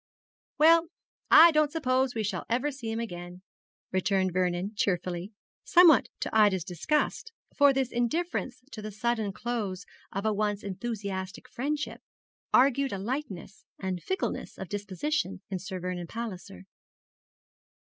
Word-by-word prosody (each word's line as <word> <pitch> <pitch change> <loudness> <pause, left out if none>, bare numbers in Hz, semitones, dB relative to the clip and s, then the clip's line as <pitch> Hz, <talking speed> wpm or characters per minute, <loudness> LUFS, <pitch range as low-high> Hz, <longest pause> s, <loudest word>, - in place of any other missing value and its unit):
'Well, 330 +2 +6 0.4
I 330 +2 +9
don't 305 -1 +2
suppose 260 -5 +1
we 220 - -1
shall 210 - -3
ever 255 +6 +1
see 255 -5 -6
him 225 +1 -2
again,' 175 -4 -7 0.5
returned 185 -1 +1
Vernon, 180 +2 0
cheerfully, 180 -1 -1 0.3
somewhat 330 -8 +6
to - - -3
Ida's 205 -5 +4
disgust; 295 - -1 0.2
for 285 -1 +6
this 265 -2 0
indifference 255 0 -2
to 215 - -7
the 215 - -5
sudden 220 0 -1
close 200 -4 -4 0.3
of 195 +2 -4
a 215 - +2
once 205 0 -1
enthusiastic 200 0 -5
friendship 285 +4 -3 0.5
argued 275 +1 +4
a - - -2
lightness 205 - -5
and 185 -2 -3
fickleness 380 0 -3
of 190 - -7
disposition 205 - -2
in 190 - -2
Sir 185 +1 -6
Vernon 180 -1 -4
Palliser. 185 - -7
215 Hz, 135 wpm, -28 LUFS, 190-265 Hz, 0.5 s, I